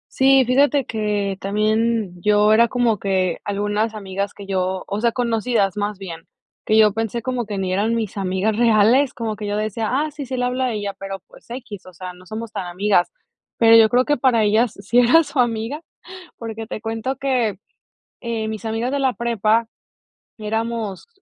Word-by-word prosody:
Sí, 270 0 +5
fíjate 280 +3 +3
que 210 -4 -2
también 215 -2 0
yo 210 +2 +4
era 235 +2 +5
como 235 -3 +1
que 185 -3 0
algunas 205 +2 -1
amigas 200 -1 -4
que 200 - -11
yo, 185 -1 -2
o 200 - -3
sea, 235 0 +1
conocidas 225 -4 0
más 205 -1 -2
bien, 165 -4 -8 0.4
que 215 - +3
yo 215 -1 +6
pensé 225 +1 -2
como 250 0 -2
que 205 -1 -5
ni 190 -1 -2
eran 210 +5 +1
mis 215 -3 -3
amigas 195 +3 -1
reales, 235 +4 +4
como 220 -3 -4
que 210 -1 -5
yo 205 - -2
decía: 215 +1 -2
"Ah, 295 +4 0
sí, 285 -1 -7
sí 255 0 -4
le 250 - -1
habla 250 +1 0
a 245 - -1
ella", 205 -1 -3
pero, 195 0 -6
pues, - - -19
equis, 235 -6 -8
o 185 - -13
sea, 180 +2 -7
no 180 +1 -16
somos 220 +3 -6
tan 195 -5 -5
amigas, 180 0 +1 0.5
pero 230 0 +7
yo 225 -1 +7
creo 250 +2 +3
que 295 +1 +1
para 240 -3 +3
ellas 215 +2 +2
sí 235 +5 +2
era 265 +7 +6
su 285 - -5
amiga, 240 +5 0 0.6
porque 225 -1 -6
te - - -5
cuento 225 +4 -3
que, 245 -8 0 0.6
eh, 230 -2 -3
mis 220 -1 -6
amigas 225 +3 -2
de 280 - -1
la 265 -2 +1
prepa 230 -1 +1 0.7
éramos 220 -2 -3
220 Hz, 190 wpm, -21 LUFS, 205-235 Hz, 0.7 s, pero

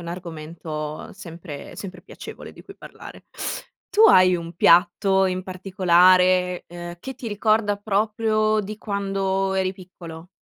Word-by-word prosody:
un 170 - -9
argomento 160 -3 -7
sempre 170 -6 -10
sempre 185 -2 -9
piacevole - - -11
di - - -15
cui 395 - -14
parlare. - - -12 0.7
Tu 425 - +3
hai 185 - +6
un 170 0 -8
piatto 190 +3 +4
in 185 0 -2
particolare, 185 -1 +3
ehm, 175 0 -8
che 265 +6 -7
ti 255 -1 -9
ricorda 215 -1 +1
proprio 215 +1 0
di 210 +1 -7
quando 195 -2 -2
eri 190 -1 0
piccolo? 175 -3 -12
185 Hz, 130 wpm, -23 LUFS, 175-205 Hz, 0.7 s, hai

